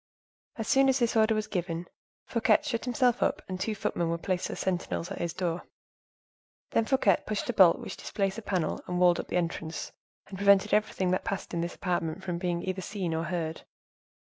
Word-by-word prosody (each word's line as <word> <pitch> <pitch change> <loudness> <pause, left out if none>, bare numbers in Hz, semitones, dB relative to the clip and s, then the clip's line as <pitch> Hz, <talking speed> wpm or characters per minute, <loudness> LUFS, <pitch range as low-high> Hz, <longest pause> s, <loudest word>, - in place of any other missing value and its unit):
As 225 -2 -4
soon 270 0 +5
as 265 - +3
this 235 -3 +1
order 220 0 +4
was 215 0 0
given, 175 -4 -3 0.4
Fouquet 230 +4 +3
shut 250 -6 -2
himself 245 -1 +2
up, 290 +2 +1
and 185 -1 -4
two 215 +3 -1
footmen 170 -4 -1
were 170 - 0
placed 180 +1 -2
as - - -5
sentinels 180 -1 -2
at - - -5
his 170 - -1
door. 175 -1 -2 1.1
Then 230 - +2
Fouquet 220 -7 +3
pushed 215 -1 -2
a - - -11
bolt 190 -5 +7
which - - -7
displaced 195 +1 -2
a - - -8
panel 185 -6 -1
that - - -14
walled 180 -1 +4
up - - -4
the - - -1
entrance, 165 -2 -3 0.3
and 190 -1 -9
prevented 200 +1 +5
everything 200 -3 +1
that 185 - 0
passed 195 -2 -4
in 170 - 0
this 170 +1 -3
apartment 175 0 -2
from 175 -2 -3
being 175 -1 -1
either 190 0 -2
seen 185 -3 -3
or 160 +1 -1
heard. 165 -2 -3
185 Hz, 205 wpm, -29 LUFS, 175-215 Hz, 1.1 s, bolt